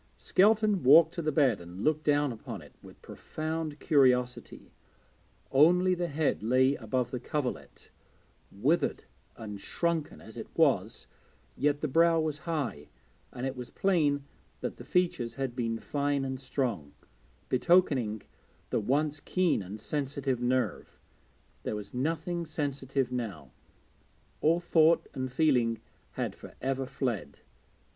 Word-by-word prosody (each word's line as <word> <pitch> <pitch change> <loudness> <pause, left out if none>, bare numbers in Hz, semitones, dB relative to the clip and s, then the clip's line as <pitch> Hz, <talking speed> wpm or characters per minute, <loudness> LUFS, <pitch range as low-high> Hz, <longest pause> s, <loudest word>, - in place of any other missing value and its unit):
Skelton 210 -1 +3
walked 160 +5 +7
to 170 - -3
the 155 -1 0
bed 135 - +2
and 85 +3 -8
looked 155 0 +1
down 145 -2 +2
upon 115 - -8
it - - -16
with - - -15
profound 155 -1 -5
curiosity. 125 -5 +1 0.8
Only 180 +6 +5
the 175 -1 -1
head 155 -5 0
lay 130 +4 +3
above 125 -1 -2
the 125 - -3
coverlet; 130 +1 -5 0.6
withered 135 - 0 0.3
and 105 -3 -7
shrunken 170 - -2
it - - -9
was, - - +2 0.5
yet 145 +1 +1
the 155 - 0
brow 165 +3 +4
was 155 -2 -2
high, 140 - -3 0.4
and 125 - -5
it 135 0 -3
was 125 -1 -7
plain 150 -7 +1 0.4
that - - -4
the - - -9
features 170 -10 0
had 135 -3 -3
been 115 -2 -1
fine 140 +2 -1
and 130 -1 -4
strong, 125 - -3 0.5
betokening 130 - +2 0.5
the - - +2
once 145 +7 0
keen 180 - +1
and 100 +3 -8
sensitive 135 0 -2
nerve 125 -5 -1 0.6
there - - -3
was 105 -1 -7
nothing 165 +5 -2
sensitive 140 -4 -2
now; 120 -6 -5 0.9
all 165 +3 +3
thought 170 -1 +3
and 130 -1 -4
feeling 125 -6 +2 0.3
had - - -3
for - - -13
ever 135 0 -2
fled. 120 - -3
140 Hz, 135 wpm, -29 LUFS, 125-160 Hz, 0.9 s, walked